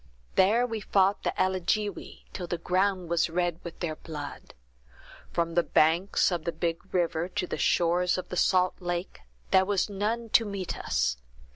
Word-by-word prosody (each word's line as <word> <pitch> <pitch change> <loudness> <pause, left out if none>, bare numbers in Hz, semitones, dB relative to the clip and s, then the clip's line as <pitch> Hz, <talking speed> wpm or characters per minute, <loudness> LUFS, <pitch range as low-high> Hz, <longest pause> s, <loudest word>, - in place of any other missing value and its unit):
There 215 +6 +4
we 225 -2 -3
fought 195 0 +2
the - - -1
Alligewi, 190 +2 -1
till 180 -3 -5
the 175 - -2
ground 185 +1 0
was 170 0 +1
red 175 0 -1
with 170 - -9
their 160 -3 -2
blood. 150 -3 -8 0.8
From 170 -1 -1
the 175 - +4
banks 170 +5 +2
of 170 -3 -2
the 170 - -1
big 170 +3 -3
river 170 -2 0
to 190 0 -2
the - - -5
shores 175 +1 +2
of 185 - -5
the - - -4
salt 185 0 +3
lake, 175 0 -4 0.3
there 190 -1 +6
was 200 +1 0
none 220 +4 -2
to 230 - +5
meet 200 -4 -4
us. 60 +1 0
180 Hz, 170 wpm, -28 LUFS, 170-195 Hz, 0.8 s, there